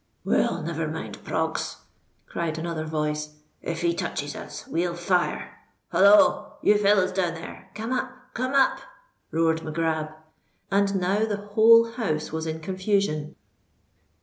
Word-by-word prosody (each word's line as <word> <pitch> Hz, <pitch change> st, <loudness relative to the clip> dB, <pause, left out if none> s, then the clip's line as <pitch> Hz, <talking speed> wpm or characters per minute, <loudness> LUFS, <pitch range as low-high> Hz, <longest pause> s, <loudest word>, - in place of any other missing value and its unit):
"Well—never -, -, 0 dB
mind, -, -, -6 dB
Proggs!" -, -, -2 dB, 0.5 s
cried 165 Hz, -2 st, -3 dB
another 160 Hz, -1 st, -3 dB
voice: 150 Hz, -1 st, -2 dB, 0.3 s
"if 165 Hz, 0 st, -4 dB
he 170 Hz, 0 st, +2 dB
touches 145 Hz, -3 st, -3 dB
us, -, -, -8 dB
we'll 170 Hz, +1 st, -1 dB
fire. 175 Hz, +1 st, -1 dB, 0.3 s
Holloa! 200 Hz, +4 st, +5 dB
you 210 Hz, 0 st, +5 dB
fellows 200 Hz, -2 st, +3 dB
down 180 Hz, -3 st, 0 dB
there—come 215 Hz, +7 st, -8 dB
up!—come 255 Hz, 0 st, -3 dB
up!" 270 Hz, -1 st, +4 dB, 0.5 s
roared 160 Hz, 0 st, +1 dB
Mac 155 Hz, -1 st, -6 dB
Grab. 160 Hz, -2 st, 0 dB, 0.6 s
And 200 Hz, 0 st, +2 dB
now 195 Hz, +4 st, +1 dB
the 210 Hz, -2 st, -2 dB, 0.2 s
whole 230 Hz, +1 st, +7 dB
house 160 Hz, -11 st, -2 dB
was 160 Hz, 0 st, -3 dB
in 160 Hz, 0 st, -4 dB
confusion. 185 Hz, -4 st, -1 dB
175 Hz, 125 wpm, -25 LUFS, 160-205 Hz, 0.6 s, whole